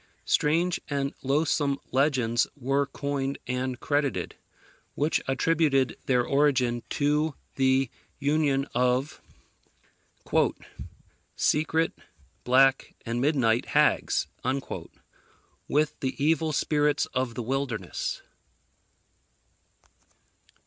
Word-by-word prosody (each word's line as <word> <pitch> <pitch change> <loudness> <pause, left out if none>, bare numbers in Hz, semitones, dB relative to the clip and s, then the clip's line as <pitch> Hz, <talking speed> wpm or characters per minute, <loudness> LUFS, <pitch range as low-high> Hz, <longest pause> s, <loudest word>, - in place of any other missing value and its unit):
Strange 165 +4 +1
and 140 -1 -2
loathsome 140 0 +1
legends 130 -4 +2
were 135 +1 0
coined 140 -1 -3
and 125 0 -2
credited, 145 -2 -1 0.6
which 150 +3 +1
attributed 135 0 +2
their 125 -2 +3
origin 130 -4 +2
to 150 +1 +1 0.2
the 130 0 +2 0.3
union 145 -1 +1
of 125 +3 0 2.1
"Secret, 160 +2 +1 0.5
black, 135 +2 +3
and 115 +1 -2
midnight 125 -5 +2
hags" - - +3 1.4
with 150 +1 0
the 130 -1 -2
evil 160 +2 +1
spirits 150 0 +1
of 130 -2 -1
the 120 - -3
wilderness. 125 -6 -3
140 Hz, 80 wpm, -27 LUFS, 130-150 Hz, 2.1 s, their